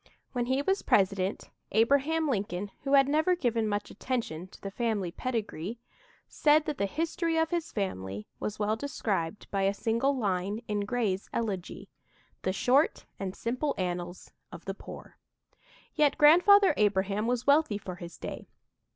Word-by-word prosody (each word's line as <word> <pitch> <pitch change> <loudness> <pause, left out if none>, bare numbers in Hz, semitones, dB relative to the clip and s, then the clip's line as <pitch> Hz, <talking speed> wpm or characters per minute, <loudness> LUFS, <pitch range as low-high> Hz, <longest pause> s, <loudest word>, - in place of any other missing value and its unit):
When 245 -2 -1
he 265 +2 +1
was 385 +5 +1
President, 195 -1 +1 0.2
Abraham 280 +8 +3
Lincoln, 200 -5 -2
who 275 - 0
had 275 -1 +6
never 315 +5 +3
given 235 -8 0
much 205 0 -2
attention 205 -10 -3
to - - -16
the 195 - -6
family 210 -5 -1
pedigree, 220 -3 -3 0.5
said 300 0 +3
that 295 - -3
the 200 - +1
history 330 - -1
of 320 +1 +1
his 340 -2 -2
family 100 - -3
was 210 0 -3
well 210 +1 +1
described 210 -8 -3
by 195 - 0
a 195 +1 +2
single 235 +6 +1
line 200 0 -1
in 205 -1 -1
Gray's 205 -4 -1
"Elegy": 200 -6 -3 0.5
"The 185 - 0
short 255 +10 +2
and 190 -1 -4
simple 255 +5 -2
annals 175 -1 -4 0.2
of - - -10
the - - -3
poor." - - -11 0.7
Yet 295 -3 +3
Grandfather 360 +5 +7
Abraham 205 +1 +1
was 245 0 0
wealthy 285 -6 +4
for 185 -3 -7
his 170 -1 -9
day. - - -7
225 Hz, 155 wpm, -29 LUFS, 195-280 Hz, 0.7 s, Grandfather